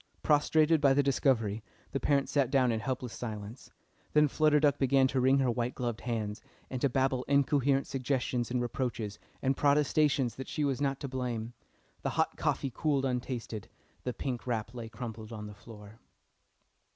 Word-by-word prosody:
Prostrated 155 +1 +4
by 135 -2 +5
the 145 - +4
discovery, 120 -6 +1 0.3
the 135 - -1
parents 140 -1 +1
sat 140 -4 +2
down 130 -3 +3
in 110 - 0
helpless 125 0 -3
silence. 110 0 -7 0.4
Then 150 0 +5
Flutter 150 +1 +3
Duck 145 -2 +3
began 135 0 +4
to 130 -1 +1
wring 130 +2 +4
her 130 -3 +2
white 120 +1 -2
gloved 120 -2 -3
hands, 110 -4 -3 0.3
and 130 -2 -3
to 140 - +3
babble 130 0 +1
incoherent 140 -1 +3
suggestions 130 -2 -1
and 125 0 0
reproaches, 120 -4 -3 0.2
and 135 0 +2
protestations 145 -3 +2
that 130 - -6
she 150 - -2
was 140 -2 0
not 140 -1 0
to 140 - -3
blame. 120 -3 -3 0.5
The - - -1
hot - - +1
coffee 135 - -1
cooled 140 -3 +1
untasted, 125 -4 -3 0.4
the 125 - -1
pink 125 0 -4
wrap 115 -1 -2
lay 115 -2 -6
crumpled 110 -2 -7
on 105 -2 -6
the 105 - -8
floor. 105 +1 -13
130 Hz, 175 wpm, -31 LUFS, 115-140 Hz, 0.5 s, by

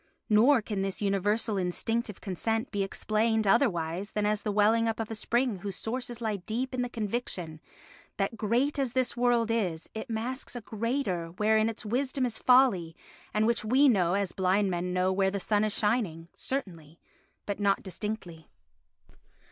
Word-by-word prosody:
Nor 230 +3 +5
can 205 -2 -3
this 195 -1 -3
universal 205 +2 0
instinctive 210 +4 -2
consent 225 +5 -2
be 205 -2 -1
explained 215 +3 0
otherwise 195 - +1
than 210 -1 0
as 210 0 +1
the 210 - -2
welling 220 +3 +3
up 225 0 -2
of 225 0 -3
a - - -1
spring 235 +1 0
whose 195 0 -4
sources 240 +1 -4
lie 220 -3 -1
deep 230 +8 -3
in 255 - -1
the 245 - -2
conviction 200 -8 -4 0.6
that 195 +3 -1
great 240 +7 0
as 260 -4 -1
this 255 -2 +1
world 240 -2 +2
is, 180 -8 -2
it 220 +4 -6
masks 240 +4 -3
a 245 - -5
greater 220 -5 -2
wherein 215 +5 +2
its 225 0 -7
wisdom 255 +4 0
is 235 -3 -3
folly 240 -11 +4 0.4
and 215 +1 +2
which 235 0 +1
we 260 +6 +4
know 185 -7 +3
as 200 -2 0
blind 190 +1 +1
men 180 +1 -2
know 185 +1 +1
where 190 0 +2
the 200 +1 -3
sun 205 +2 +1
is 215 - 0
shining, 205 -7 0
certainly, 170 - -5 0.5
but 205 0 -3
not 200 -1 +2
distinctly. 185 -5 -6
215 Hz, 170 wpm, -29 LUFS, 195-235 Hz, 0.6 s, Nor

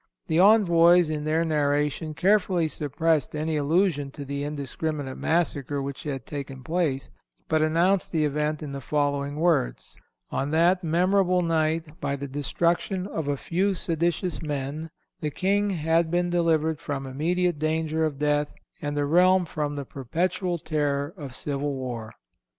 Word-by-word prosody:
The 160 0 +1
envoys, 175 -5 +6
in 150 -1 -3
their 160 +2 +1
narration, 150 0 0
carefully 185 -3 +2
suppressed 155 0 0
any 155 +1 -1
allusion 150 -1 +1
to 140 - -7
the 140 +1 -3
indiscriminate 145 -1 -3
massacre 145 -4 0
which 140 0 -5
had 135 -5 -5
taken 135 -3 -7
place, 155 -3 -1 0.4
but 155 -1 +2
announced 170 +5 +2
the 155 -3 +2
event 150 +1 -1
in 145 - -6
the 140 0 -5
following 145 +1 -1
words: 155 - 0 0.4
On 135 +1 -1
that 175 +4 +3
"memorable 180 +2 +2
night, 160 -1 0
by 140 - -1
the 140 0 -5
destruction 170 +7 -1
of 160 -6 -4
a 145 -1 0
few 190 +7 0
seditious 170 +1 -1
men, 150 +1 -4 0.3
the 150 - -2
King 200 +6 +1
had 165 -2 +1
been 175 +1 0
delivered 160 -3 +1
from 140 -2 -4
immediate 170 +5 0
danger 160 0 0
of 155 -3 -1
death, 150 0 +1 0.3
and 145 0 -3
the 145 - +1
realm 180 +4 +4
from 150 -2 -3
the 140 -1 -4
perpetual 175 +8 -2
terror 145 -1 -1
of 140 -8 -6
civil 145 0 -2
war." 120 -4 -5
155 Hz, 150 wpm, -26 LUFS, 145-170 Hz, 0.4 s, envoys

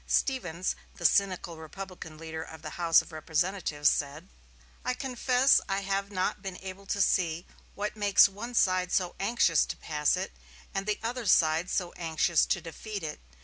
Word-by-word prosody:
Stevens, 185 -10 0 0.2
the - - -7
cynical 185 -4 +2
Republican 160 0 -9
leader 160 0 -6
of 160 -1 -10
the - - -6
House 170 -2 +4
of - - -15
Representatives, 160 -1 -1
said: 145 - 0 0.5
"I 250 - -1
confess 255 +1 +3
I 195 0 0
have 195 0 -1
not 185 -2 -1
been 190 -2 -6
able 195 +1 -8
to 200 - 0
see 170 -2 +1 0.3
what 210 +1 -3
makes 205 -2 +6
one 225 +5 -7
side 185 -3 +2
so 180 -2 +1
anxious 195 -6 +3
to - - -5
pass 150 -2 0
it, - - -3 0.4
or 195 - 0
the 210 +1 -1
other 235 0 -3
side 160 0 +4
so 175 -2 -1
anxious 165 0 +2
to - - +1
defeat 195 +4 -7
it. 155 - -5
185 Hz, 170 wpm, -29 LUFS, 160-200 Hz, 0.5 s, makes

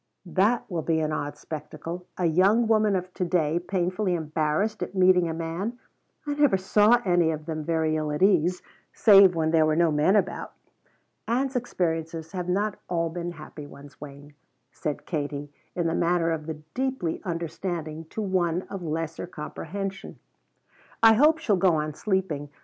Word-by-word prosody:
"That 200 +7 +1
will 175 -5 -3
be 160 +1 0
an 155 -1 -1
odd 145 -1 -3
spectacle 160 +3 -7
a 180 - 0
young 195 +8 +3
woman 215 -2 +3
of 185 0 -4
to - - -2
day 170 -2 +1
'painfully 185 +1 -1
embarrassed' 160 +6 -1
at - - -4
meeting 180 -2 +4
a - - -2
man. 170 +8 -4 0.5
I 290 - -1
never 290 -8 +3
saw 210 +5 +4
any 175 -3 +3
of 155 -1 -4
them 155 -1 -4
very 160 0 0
ill 155 -1 -2
at 150 +5 -1
ease, 180 -2 +3 0.3
save 195 -4 +7
when 160 -1 +1
there 160 -1 +4
were 155 - +2
no 170 0 +3
men 150 +7 +3
about." 195 -3 -1 0.7
"Ann's 260 +3 0
experiences 165 -8 -2
have 180 -1 -4
not 205 +3 0
all 165 -2 0
been 175 0 -4
happy 150 -2 -10
ones, 140 0 -14
Wayne," 145 0 -11 0.4
said 150 -2 -4
Katie 145 -2 -4 0.2
in 175 - -1
the 165 - +1
manner 170 -1 +1
of 155 -1 -3
the 160 - -3 0.2
deeply 260 -10 -2
understanding 165 -2 -4
to 215 +7 -5
one 180 -2 0
of 195 - -5
lesser 165 +1 -4
comprehension. 190 +4 -6 0.9
"I 225 0 +9
hope 300 +8 +5
she'll 220 -11 +1
go 180 -2 +3
on 155 0 -2
sleeping. 185 -6 -2
175 Hz, 170 wpm, -26 LUFS, 155-195 Hz, 0.9 s, I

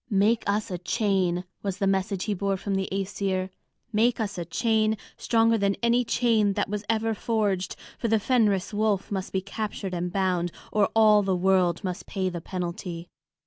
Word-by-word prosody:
"Make 210 +2 +3
us 205 0 0
a 180 - -3
chain," 185 -2 0 0.2
was 195 -2 -3
the 200 - 0
message 195 0 0
he 215 - -1
bore 195 0 -1
from 200 +1 -3
the 195 0 -1
Æsir, 190 -1 -2 0.4
"make 230 +3 +3
us 205 -4 -2
a 170 - -3
chain 220 +4 +1 0.2
stronger 225 -1 +2
than 200 0 +2
any 235 +1 +3
chain 225 -4 +2
that - - -1
was 210 +1 -3
ever 225 0 +1
forged; 205 -4 -1 0.2
for 235 - -1
the 225 -1 +3
Fenris 210 -5 +1
wolf 210 -2 0
must 190 -2 -3
be 190 - 0
captured 200 -1 -4
and 175 0 -2
bound, 180 -2 0 0.2
or 210 -2 +3
all 215 -2 +6
the 190 -2 0
world 180 -1 +2
must 180 -2 -4
pay 190 -1 -1
the 175 -2 -5
penalty." 175 -1 -5
200 Hz, 185 wpm, -26 LUFS, 185-215 Hz, 0.4 s, all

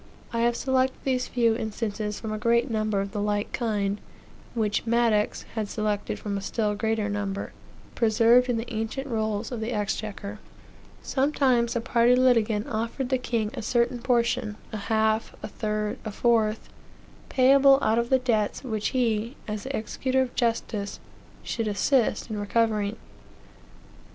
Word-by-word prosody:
I 230 - 0
have 235 0 +2
selected 260 0 +1
these 255 -2 0
few 230 -2 +2
instances 215 -2 -3
from 220 -1 -4
a 215 - -3
great 235 +3 +2
number 215 -2 0
of 195 0 -4
the 205 0 -3
like 205 0 -1
kind, 205 -4 -1 0.5
which 215 0 0
Madox 230 -3 +2
had 215 -2 -3
selected 210 -2 -2
from 200 -1 -3
a - - -8
still 210 +1 -1
greater 220 0 0
number, 200 -1 -3 0.4
preserved 235 +2 +4
in 240 - +1
the 230 +1 -5
ancient 225 +5 -3
rolls 220 -3 -2
of 245 - -3
the 220 +2 -2
exchequer. 210 -1 -3 0.6
Sometimes 260 -4 +2
a 235 - 0
party 240 0 +4
litigant 230 -4 +3
offered 230 +4 -2
the 260 -1 +1
king 230 -4 -1
a - - -5
certain 240 +2 +1
portion, 235 -3 0
a 220 - -3
half, 220 0 +1
a - - -3
third, 210 -1 -3
a 215 - -4
fourth, 220 -1 +1 0.6
payable 270 +1 +6
out 220 +2 +3
of 235 0 -1
the 265 - +5
debts 230 -4 0
which 220 -5 -2
he, 235 -1 0
as 210 +1 -4
the 270 - -2
executor 260 +4 0
of 250 - -6
justice, 225 -3 -1 0.4
should 225 -2 -2
assist 215 +3 +1
in 215 -2 -4
recovering. 210 0 +1
225 Hz, 155 wpm, -26 LUFS, 210-245 Hz, 0.6 s, payable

